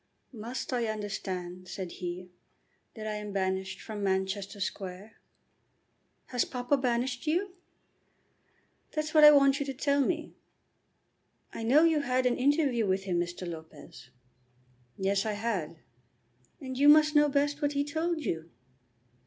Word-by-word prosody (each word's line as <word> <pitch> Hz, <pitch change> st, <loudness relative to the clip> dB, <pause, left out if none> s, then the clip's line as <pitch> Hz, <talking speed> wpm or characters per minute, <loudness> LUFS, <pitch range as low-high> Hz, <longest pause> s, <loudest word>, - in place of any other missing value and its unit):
"Must 235 Hz, +3 st, -5 dB
I 240 Hz, -2 st, 0 dB
understand," 185 Hz, -4 st, -5 dB
said 185 Hz, -1 st, -6 dB
he, 180 Hz, 0 st, -6 dB, 0.6 s
"that 215 Hz, -2 st, -7 dB
I 215 Hz, -, -2 dB
am 210 Hz, -1 st, -6 dB
banished 190 Hz, -1 st, -2 dB
from 210 Hz, -2 st, -6 dB
Manchester 190 Hz, +1 st, -1 dB
Square?" 195 Hz, +2 st, -5 dB, 1.2 s
"Has 245 Hz, -2 st, +1 dB
papa 250 Hz, +2 st, 0 dB
banished 250 Hz, +1 st, -1 dB
you?" 360 Hz, +5 st, 0 dB, 1.4 s
"That's 305 Hz, 0 st, -2 dB
what 305 Hz, -1 st, +6 dB
I 300 Hz, -, +12 dB
want 280 Hz, -1 st, +5 dB
you 285 Hz, -, -1 dB
to 270 Hz, -, -4 dB
tell 280 Hz, +1 st, +1 dB
me." 325 Hz, +2 st, -2 dB, 1.2 s
"I -, -, -6 dB
know 260 Hz, +8 st, +5 dB
you 325 Hz, -2 st, +4 dB
had 255 Hz, -2 st, 0 dB
an 250 Hz, -, +3 dB
interview 270 Hz, -5 st, +2 dB
with 190 Hz, +1 st, 0 dB
him, 180 Hz, -3 st, -1 dB
Mr. 175 Hz, +1 st, -4 dB
Lopez." 160 Hz, -6 st, -10 dB, 0.9 s
"Yes. 195 Hz, +1 st, +1 dB
I 215 Hz, -, -2 dB
had." 205 Hz, -7 st, -3 dB, 0.8 s
"And 260 Hz, -1 st, -6 dB
you 290 Hz, +1 st, +7 dB
must 305 Hz, 0 st, +6 dB
know 295 Hz, 0 st, +5 dB
best 290 Hz, +1 st, 0 dB
what 290 Hz, 0 st, +1 dB
he 285 Hz, 0 st, +1 dB
told 320 Hz, +3 st, -2 dB
you." 160 Hz, 0 st, -3 dB
235 Hz, 145 wpm, -29 LUFS, 190-285 Hz, 1.4 s, I